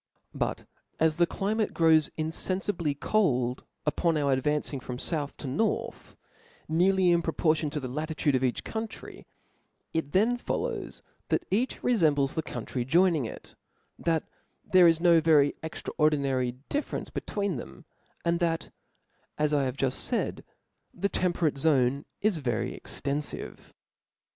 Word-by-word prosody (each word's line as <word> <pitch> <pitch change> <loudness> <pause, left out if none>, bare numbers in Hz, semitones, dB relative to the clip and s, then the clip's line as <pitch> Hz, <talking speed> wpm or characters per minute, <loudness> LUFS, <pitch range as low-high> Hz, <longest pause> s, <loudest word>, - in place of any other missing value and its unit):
But - - -2 0.3
as 160 0 +3
the 175 0 +4
climate 215 +4 -1
grows 160 -2 +5
infenfibly 165 -1 -2
cold 130 - +1 0.2
upon 160 +2 +1
our 140 -2 +1
advancing 145 +1 0
from 125 0 -6
fouth 145 +1 -3
to - - -8
north, 150 +13 -2 0.5
nearly 180 +2 +3
in 170 0 +4
proportion 160 -2 +1
to 150 +1 -3
the 130 - -5
latitude 155 +2 -1
of 130 0 +1
each 125 -2 0
country; 220 0 -6 0.7
it 160 -3 -1
thence 235 +6 +2
follows - - -3 0.3
that 350 - +1
each 235 +6 0
rcfembles 150 - +3
the 160 - -1
country 125 -2 -4
joining 165 +1 +3
to - - -4
it, - - -12 0.4
that 165 -2 +1 0.5
there 185 -2 +8
is 165 -1 +4
no 170 -1 +5
very 150 -3 +5
extras 160 - -6
ordinary 140 -5 +2 0.2
diHerepce 290 +1 -2
between 200 -6 -2
them, - - -10 0.4
and 170 0 +2
that, 165 -2 -1 0.7
as 150 0 +1
I 140 -2 +3
have 130 +1 -3
juft 135 -2 -1
faid, - - -1 0.5
the 200 +3 0
temperate 170 -7 0
zone 135 -2 +2 0.2
is 210 -4 +2
very 120 -5 -1
ex - - -5
tenfive. 145 +1 -4
155 Hz, 145 wpm, -28 LUFS, 140-175 Hz, 0.7 s, there